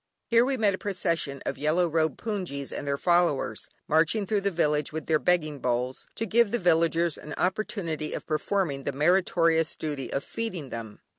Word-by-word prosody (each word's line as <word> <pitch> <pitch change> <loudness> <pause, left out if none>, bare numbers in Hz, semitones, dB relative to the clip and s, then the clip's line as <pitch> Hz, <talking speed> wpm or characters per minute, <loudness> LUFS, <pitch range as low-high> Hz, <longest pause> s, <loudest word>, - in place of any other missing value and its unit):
Here 235 -1 +4
we 265 +1 0
met 210 -4 +3
a 185 - -4
procession 165 -8 -1
of - - -3
yellow 160 +4 +2
robed 160 -1 0
"hpoongyis" 180 - -3
and 145 - -5
their 140 0 0
followers, 175 -4 +1 0.2
marching 165 +7 +3
through 205 +1 0
the 200 - +1
village 150 -5 0
with 160 -1 -5
their 155 -2 +2
begging 155 -5 +1
bowls, 125 +1 -2
to 225 - -2
give 230 +1 +3
the 240 - 0
villagers 170 -3 +2
an 150 -1 -7
opportunity 180 -5 -2
of - - -5
performing 155 -2 -1
the 140 - -2
meritorious 165 +1 +2
duty 145 -4 -4
of 140 - -1
feeding 185 - -4
them. 110 -3 -7
165 Hz, 180 wpm, -27 LUFS, 150-190 Hz, 0.2 s, Here